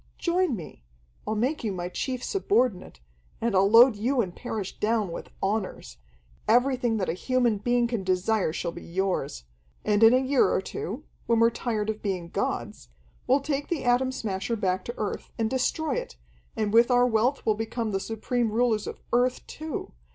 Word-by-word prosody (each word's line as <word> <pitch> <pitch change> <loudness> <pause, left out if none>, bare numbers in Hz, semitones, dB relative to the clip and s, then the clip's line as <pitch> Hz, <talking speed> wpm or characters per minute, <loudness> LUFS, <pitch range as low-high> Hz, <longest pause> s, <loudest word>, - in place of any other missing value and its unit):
Join 350 -5 +1
me. 165 - -10 0.4
I'll 215 - 0
make 255 +8 -1
you 215 - -1
my 175 -2 -3
chief 250 +7 -3
subordinate, 225 - 0 0.4
and 230 -1 0
I'll 195 +1 +4
load 235 +2 +8
you 245 +6 0
and 185 -6 -1
Parrish 220 -6 -5
down 215 -3 +1
with - - -7
honors. 195 - -2 0.5
Everything 245 -1 +3
that 190 - -1
a - - 0
human 240 +2 +1
being 240 +3 +2
can 235 -4 -2
desire 185 0 +1
shall 170 - -3
be 170 - -9
yours. 180 - -2 0.4
And 210 0 +2
in 225 0 +9
a 250 - +5
year 265 +1 +3
or - - +2
two, 215 - -5 0.2
when 230 -1 +3
we're 230 0 +5
tired 220 -2 -1
of 215 - -9
being 185 -4 -3
gods, - - -3 0.4
we'll 275 +2 +4
take 285 0 -2
the 340 -5 -2
Atom 250 +1 +2
Smasher 200 -3 -2
back 185 -3 -1
to 240 - -6
Earth 210 -2 -4
and 225 -1 0
destroy 265 +3 0
it, - - -6 0.4
and 210 -1 0
with 235 +2 +6
our 245 0 +5
wealth 245 +3 +1
we'll 220 - +4
become 225 +1 -3
the 195 - 0
supreme 225 +2 -1
rulers 225 -2 +1
of - - -6
Earth 245 +1 +2
too. 310 -3 -6
225 Hz, 185 wpm, -27 LUFS, 200-250 Hz, 0.5 s, in